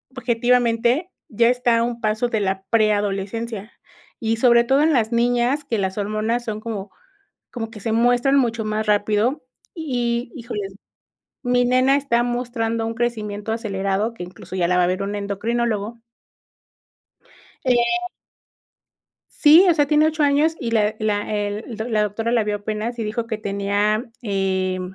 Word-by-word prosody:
objetivamente, 245 +5 +1 0.2
ya 230 +2 +3
está 245 -1 +2
a 230 - +2
un 235 0 -3
paso 220 +2 0
de 225 -2 -1
la 190 -1 -1
preadolescencia, 215 0 0 0.5
y 225 0 0
sobre 235 0 +5
todo 270 +4 +2
en 315 +2 +3
las 225 -4 +1
niñas, 245 +4 +1
que 240 -5 -2
las 190 -1 -2
hormonas 215 +3 -1
son 215 -2 -4
como 210 -3 -6 0.6
como 225 -3 -4
que 215 -2 -11
se 225 - -2
muestran 245 +4 +3
mucho 230 -3 0
más 215 0 -2
rápido 210 +6 +1 0.3
y, 245 -6 -2
híjole, 235 -5 -5 0.8
mi 245 -1 +2
nena 255 +2 +3
está 270 -4 +1
mostrando 240 -2 -2
un 225 - -3
crecimiento 220 -3 -3
acelerado 200 -1 -2
que 230 - -11
incluso 180 +1 -9
ya 175 -2 +2
la 180 - +1
va 180 - +4
a - - +2
ver 185 +2 -1
un 200 +1 -3
endocrinólogo. 215 +2 -2 1.7
Eh 255 - +4 1.6
Sí, 320 +5 +6
o - - +4
sea, 295 -2 +2
tiene 300 +1 +4
8 315 -1 -1
años 290 +3 +3
y 235 - -2
la 215 -1 +2
la, 210 -1 0
eh, 205 +1 -2
la 220 -2 -1
doctora 220 +3 -2
la 235 -2 +3
vio 210 0 -1
apenas 215 +3 -4
y 225 - -2
dijo 225 +2 -3
que 220 -2 -3
tenía, 205 +2 0 0.2
eh, 190 -3 -1
225 Hz, 160 wpm, -21 LUFS, 210-245 Hz, 1.7 s, Sí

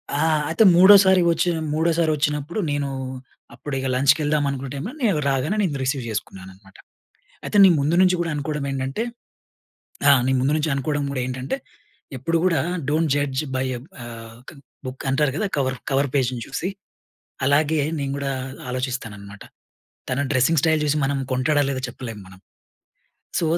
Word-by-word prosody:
ఆ! - - 0 0.3
అయితే 165 +7 +3
మూడోసారి 190 0 +7
వచ్చి 165 +2 +1 0.2
మూడోసారి 165 0 +1
వచ్చినప్పుడు 150 +4 -2
నేను, 145 -1 -1 0.6
అప్పుడిక 135 -2 -5
లంచ్‌కెళ్దాం 145 +3 +2
అనుకున 135 0 -4
టైమ్‌లో, 145 - -5
నేను 200 -10 +2
రాగానే 135 +9 0
నేను 155 -7 -1
రిసీవ్ 135 0 -1
జేసుకున్నాననమాట. 95 -2 -8 0.7
అయితే, - - 0
నీ - - +7
ముందు 145 +4 +1
నుంచి 185 -1 +4
గూడా 165 -1 -2
అనుకోడమేంటంటే 140 +2 -3 1.1
ఆ! - - +8 0.2
నీ 130 - +2
ముందు 135 +3 +1
నుంచి 155 0 -1
అనుకోడం 145 +2 -1
గూడా 135 -2 -3
ఏంటంటే, 130 - -3 0.6
ఎప్పుడు 150 +7 -1
గూడా, 180 -3 +3 0.3
డోంట్ 155 +1 +1
జడ్జ్ 145 -2 -1
బై 130 - 0
ఎ - - -6 0.3
ఆహ్, 115 -1 -10
క్ - - -8 0.3
బుక్ 130 +1 -7
అంటారు 135 0 +1
కదా! 210 - 0
కవర్ 130 -2 0
కవర్ 140 +1 +1
పేజ్‌ని 130 -3 0
చూసి. 180 - -3 0.8
అలాగే 150 +3 +2 0.2
నేను 140 -1 -2
గూడా 140 -1 -2 0.4
ఆలోచిస్తాననమాట. 115 -6 -5 0.7
తన 130 +2 0
డ్రెసింగ్ 135 +4 +3
స్టైల్ 160 -1 +2
జూసి, 150 0 +1
మనం 140 +1 0
కొంటాడో 135 +3 +2
లేదో 130 -1 -3
చెప్పలేం 120 -3 -8
మనం. 95 0 -15 1.0
సో, - - 0
140 Hz, 150 wpm, -22 LUFS, 130-155 Hz, 1.1 s, ఆ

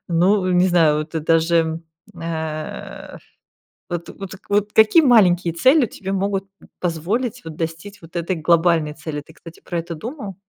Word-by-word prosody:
ну, 185 +3 +2
не 180 +1 +4
знаю, 160 -4 +3
вот 155 +1 -5
ты 160 - -3
даже, 165 0 +2 0.4
э 160 -2 -6 0.7
Вот 175 -1 -4
вот 195 -1 -9 0.2
вот 205 +1 +1
какие 220 +9 +6
маленькие 180 - +4
цели 260 - +4
тебе 195 -2 -7
могут 195 0 -1 0.4
позволить, 205 +9 -2
вот, 160 -1 -7
достичь 165 +5 -6
вот 165 +2 -16
этой 170 +2 -1
глобальной 165 -1 +2
цели? 150 -1 -6
Ты, 160 - -18
кстати, 165 0 -14
про 170 -2 -3
это 170 0 -6
думал? 215 - -7
170 Hz, 155 wpm, -21 LUFS, 160-200 Hz, 0.7 s, какие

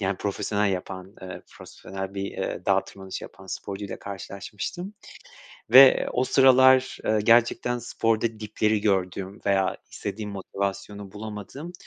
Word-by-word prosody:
yani 95 -1 0
profesyonel 100 +1 -1
yapan, 95 +1 -6
eee, 95 0 -8
profesyonel 95 0 -8
bir, 95 - -3
eee, - - -4
dağ - - +3
tırmanışı 95 -1 -8
yapan 95 0 -13
sporcuyla 100 +1 -6
karşılaşmıştım 100 - -6 0.8
ve 135 +1 +8
o 125 - +1
sıralar, 130 0 +5
eee, 110 -1 +2
gerçekten 120 +1 +3
sporda 115 -2 -1
dipleri 105 0 0
gördüğüm 95 -1 -1
veya 95 -1 +2
istediğim 105 +1 -5
motivasyonu 100 0 -5
bulamadığım 110 - -7
105 Hz, 120 wpm, -25 LUFS, 95-115 Hz, 0.8 s, ve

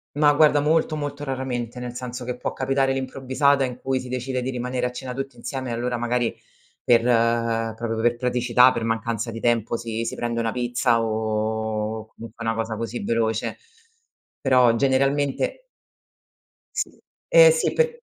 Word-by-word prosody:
No, 145 -1 +4
guarda 150 -1 +5
molto 155 +1 +2
molto 145 -1 -4
raramente, 125 -3 -3
nel 125 0 -5
senso 125 0 -6
che 125 0 -4
può - - -3
capitare 135 0 +1
all'improvvisata 135 +1 +1
in 125 -1 -6
cui 130 0 -1
si 125 - -8
decide 130 0 -2
di 130 - -3
rimanere 125 0 -2
a - - -5
cena 125 0 -6
tutti 135 -1 -5
insieme 125 +2 -5
e - - -2
allora 120 +1 -2
magari 120 0 0 0.5
per 115 -1 +4 0.7
proprio 115 0 -3
per 120 0 +2
praticità, 125 +1 +4
per 115 - -3
mancanza 115 0 -2
di 115 - -6
tempo 115 -1 +1
si 115 0 -4
si - - -3
prende 120 -1 -2
una 115 -1 0
pizza 120 -1 +1
o 110 0 -2
comunque 115 +1 -9
una 115 0 0
cosa 115 0 -2
così 115 +1 -4
veloce. 110 -1 -1 0.8
Però 125 -3 +4
generalmente 140 - +1 1.1
Sì. - - -1 0.4
Eh, - - +8
sì 485 - 0
per 475 0 +1
125 Hz, 160 wpm, -23 LUFS, 115-135 Hz, 1.1 s, Eh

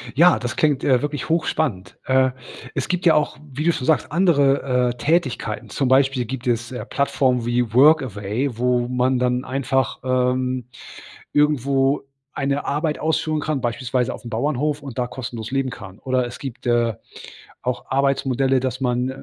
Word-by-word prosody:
Ja, 175 +4 +6
das 125 +1 -4
klingt, 145 -3 +1
äh, 130 -3 +4
wirklich 145 -2 -3
hochspannend. 150 - -1
Äh, 130 0 +3 0.4
es - - -2
gibt 180 -1 -1
ja 165 - +7
auch, 150 -1 0
wie 145 +4 -3
du 170 - +4
schon 140 -6 -4
sagst, 155 -2 +1
andere, 140 -7 +3
äh, 120 - -6
Tätigkeiten. 130 -5 -1
Zum 135 - 0
Beispiel 130 -1 +3
gibt 130 +1 -6
es, 120 -1 0
äh, 125 - -5
Plattformen 130 -3 0
wie 120 -1 0
„Workaway“, 125 -3 +2
wo 125 0 +1
man 125 +1 +1
dann 125 0 0
einfach, 130 -2 -1
ähm, 130 -1 0 0.7
irgendwo 140 -1 +2 0.3
eine 140 +1 -1
Arbeit 150 +2 -1
ausführen 155 0 0
kann, 150 -2 -2
beispielsweise 125 +1 -1
auf - - -10
'm - - -6
Bauernhof 145 +4 -1
und 135 -4 -8
da 125 - +1
kostenlos 120 -3 -6
leben 135 -1 0
kann. 95 -4 -10
Oder 130 -1 0
es 120 - -8
gibt, 135 -2 -8
äh, 120 -2 +2 0.7
auch 125 0 -3
Arbeitsmodelle, 135 -1 +1
dass 130 0 -3
man, 125 0 0
130 Hz, 165 wpm, -22 LUFS, 125-140 Hz, 0.7 s, ja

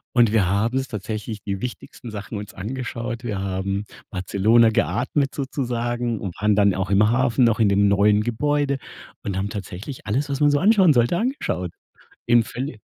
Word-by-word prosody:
Und 120 -3 +5
wir 105 -5 +3
haben 110 +6 +1
uns 135 0 -1
tatsächlich 105 0 -5
die 100 -1 -4
wichtigsten 120 -1 -7
Sachen 105 0 -6
uns 105 0 -8
angeschaut. 120 +2 -5
Wir 105 -5 -3
haben 95 +1 -2 0.3
Barcelona 105 +5 +3
geatmet 130 +5 0
sozusagen 120 -4 -2
und 95 -4 -5
waren 105 0 +3
dann 100 -1 +3
auch 95 0 -2
im 105 +2 +4
Hafen 120 0 +3
noch 115 -1 +2
in 110 - +4
dem 100 +1 +3
neuen 105 +1 +4
Gebäude 140 +5 0 0.5
und 95 -2 -3
haben 100 +2 -1
tatsächlich 100 +6 -7
alles, 130 +8 -1
was 140 -1 -2
man 145 0 +5
so 145 - +2
anschauen 195 -5 +5
sollte 120 +6 +2
angeschaut. 175 - -2 0.6
In 120 0 +5
völli 125 +2 -6
115 Hz, 175 wpm, -23 LUFS, 100-125 Hz, 0.6 s, Und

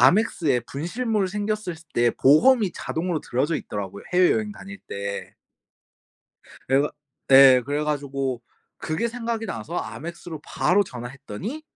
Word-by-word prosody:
Amex에 170 - +3
분실물이 190 - -2
생겼을 210 -2 -2 0.2
때 120 0 +4
보험이 200 - +5
자동으로 165 -1 -3
들어져 145 +6 0
있더라고요, 100 -1 -6
해외여행 210 +4 +3
다닐 200 -1 -10
때. 100 0 -5 1.3
그래 135 +1 +4
가 150 - -1 0.4
예 135 -2 +9
그래 145 +3 -1
가지고 135 -4 -2 0.3
그게 160 +9 -2
생각이 230 -1 -3
나서 135 - -6 0.2
Amex로 165 +2 -7
바로 200 +3 +2
전화했더니 130 - -7
160 Hz, 320 characters per minute, -24 LUFS, 130-205 Hz, 1.3 s, 예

